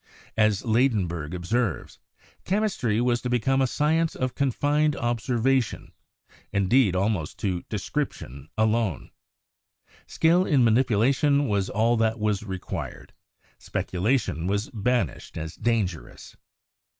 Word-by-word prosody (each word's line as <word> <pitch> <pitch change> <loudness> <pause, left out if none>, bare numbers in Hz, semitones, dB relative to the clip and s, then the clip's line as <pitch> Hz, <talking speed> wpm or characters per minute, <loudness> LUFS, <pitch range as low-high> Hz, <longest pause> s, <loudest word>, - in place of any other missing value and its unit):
As 110 -3 +2
Ladenburg 100 - 0
observes, 105 +5 -2 0.4
"Chemistry 185 - 0
was 120 0 +1
to 125 - -3
become 130 +3 +1
a 130 - +3
science 160 +5 +1
of 130 -1 -2
confined 145 +3 +1
observation 120 +2 0 0.3
— - - -28
indeed 100 +1 +3
al 95 +2 +2
most 95 -9 -3
to 95 -5 -2
description 95 - -4
alone. 110 - 0 1.0
Skill 170 +3 +3
in 140 -6 +4
manipulation 130 +5 +3
was 100 -3 0
all 115 +3 +2
that 110 0 +1
was 105 -2 0
required; 95 -4 -6 0.5
speculation 95 - -1
was 100 +2 -1
banished 115 - -2
as 80 0 -5
dangerous. 95 - -3
115 Hz, 115 wpm, -25 LUFS, 100-130 Hz, 1.0 s, in